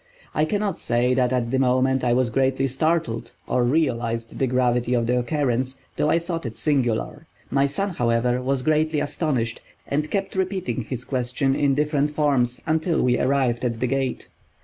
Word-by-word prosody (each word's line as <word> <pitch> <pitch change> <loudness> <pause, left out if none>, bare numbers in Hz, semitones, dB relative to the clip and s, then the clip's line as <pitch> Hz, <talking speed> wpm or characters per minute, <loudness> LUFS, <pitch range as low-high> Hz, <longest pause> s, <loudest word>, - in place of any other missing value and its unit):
I 155 - +2
cannot 205 +3 -1
say 120 +2 +1
that 125 -1 +2
at 120 -2 0
the 130 - +1
moment 130 0 +2
I 120 - +2
was 120 -1 +2
greatly 135 +2 +1
startled, 130 -4 -1
or 125 - +1
realized 120 -5 0
the 135 - +2
gravity 125 -1 +1
of 120 -1 +1
the 125 +1 +2
occurrence, 130 0 -1 0.2
though 150 - +1
I 165 - +4
thought 170 0 -3
it 115 -3 -5
singular. 140 +1 -1 0.2
My 140 0 +3
son, 195 +8 -2
however, 120 -3 +1
was 130 0 0
greatly 155 +1 +2
astonished 140 -6 -1 0.2
and 150 +2 -1
kept 195 -1 -2
repeating 185 - -1
his 125 +2 -6
question 130 +1 0
in 140 -2 +2
different 150 0 +1
forms 140 -5 +1
until 160 +1 +1
we 125 -1 +2
arrived 130 -3 +1
at 115 -2 -1
the 125 - +1
gate. 135 0 -2
130 Hz, 175 wpm, -23 LUFS, 120-150 Hz, 0.2 s, I